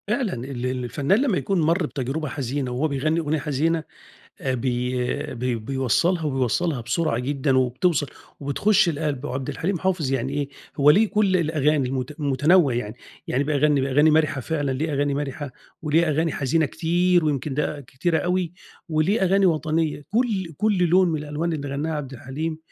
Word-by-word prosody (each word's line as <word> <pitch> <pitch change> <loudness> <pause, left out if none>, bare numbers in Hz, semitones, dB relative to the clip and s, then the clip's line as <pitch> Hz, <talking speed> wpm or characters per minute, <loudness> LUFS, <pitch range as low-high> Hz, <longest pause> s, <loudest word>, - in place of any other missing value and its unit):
فعلًا 215 -1 0
ال 125 0 -5
ال 125 0 -2
الفنان 145 - +1
لمّا 245 -10 +1
يكون 195 -3 0
مَر 165 +2 +2
بتجربة 145 +2 -3
حزينة 135 -1 -3
وهو 130 +6 0
بيغني 155 +3 0
أغنية 155 -1 -1
حزينة، 160 +3 0 0.6
آآ، 130 -1 -1
بي 125 0 -2
بي 125 +1 -1
بيوصّلها 135 - 0
وبيوصّلها 135 +2 0
بسرعة 120 +3 -1
جدًا، 135 +1 +1
وبتوصَل 135 +5 +1 0.3
وبتخش 175 +8 +2
القلب. 145 -4 -2
وعبدالحليم 150 +7 -2
حافظ 175 -7 0
يعني 135 0 -1
إيه، 145 -1 -2 0.3
هو 145 +1 +6
ليه 210 +8 +5
كلّ 200 -3 +2
الأغاني 150 -4 +1
المت 135 +4 -4
متنوع 145 +1 +3
يعني، 110 -3 -3 0.3
يعني 135 +3 +1
بيغني 145 -2 +2
أغاني 145 +4 +5
مرحة 155 -3 +2
فعلًا 145 0 -1
ليه 150 +4 -2
أغاني 145 0 0
مرحة، 145 0 -4 0.3
وليه 160 +2 +2
أغاني 160 +1 +1
حزينة 150 +3 +1
كتير، 175 +3 +2
ويمكن 145 -2 -1
ده 150 0 -2
كتيرة 140 +6 -1
أوي، 180 -1 -1 0.4
وليه 165 +7 +1
أغاني 195 +1 +4
وطنية، 155 -2 0
كلّ 210 -6 0
كلّ 210 +1 +1
لون 180 +2 +4
من 160 -2 -1
الألوان 150 +3 -3
اللي 145 -3 -4
غناها 145 +4 -2
عبد 140 -3 -6
الحليم، 145 +6 -5
150 Hz, 165 wpm, -23 LUFS, 135-165 Hz, 0.6 s, هو